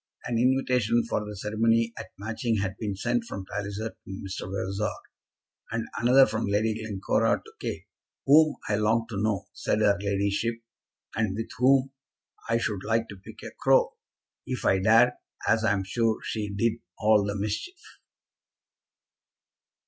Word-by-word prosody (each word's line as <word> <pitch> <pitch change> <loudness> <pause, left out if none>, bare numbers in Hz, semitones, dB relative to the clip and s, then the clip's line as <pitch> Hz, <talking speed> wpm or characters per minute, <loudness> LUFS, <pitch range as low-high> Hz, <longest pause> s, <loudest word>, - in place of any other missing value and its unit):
An 120 -1 0
invitation 125 -2 +2
for 105 - -1
the 105 0 -7
ceremony 115 +3 +1
at - - -7
Matching 110 +2 -2
had 95 -2 -2
been 105 -3 -2
sent 120 +4 0
from 100 -3 -6
Mr. - - -18
Palliser 100 +2 -3
to - - -24
Mr. 95 -1 -6
Vavasor, 100 +2 -1 0.8
and 115 0 -2
another 130 +3 +7
from 110 -1 -2
Lady 105 +2 +1
Glencora 105 -3 0
to - - -13
Kate, - - -5 0.4
"whom 155 +2 +6
I 105 - +1
long 110 +2 +2
to 100 -3 -3
know," 105 -2 0
said - - -1
her 100 -2 +3
ladyship, 100 +3 0 0.6
"and 110 -4 0
with 115 +1 -5
whom 135 +1 +4 0.6
I 115 - +3
should 105 -5 -2
like 115 +1 0
to 100 - -9
pick - - -12
a - - -7
crow, - - +4 0.5
if 130 -2 -4
I 95 - +4
dared, 115 +5 +5 0.4
as 110 +1 +3
I'm 100 -3 +2
sure 115 +2 0
she 105 -2 -3
did 115 +3 0 0.2
all 105 -1 +4
the 100 0 -2
mischief." 110 - -5
110 Hz, 155 wpm, -27 LUFS, 100-115 Hz, 0.8 s, another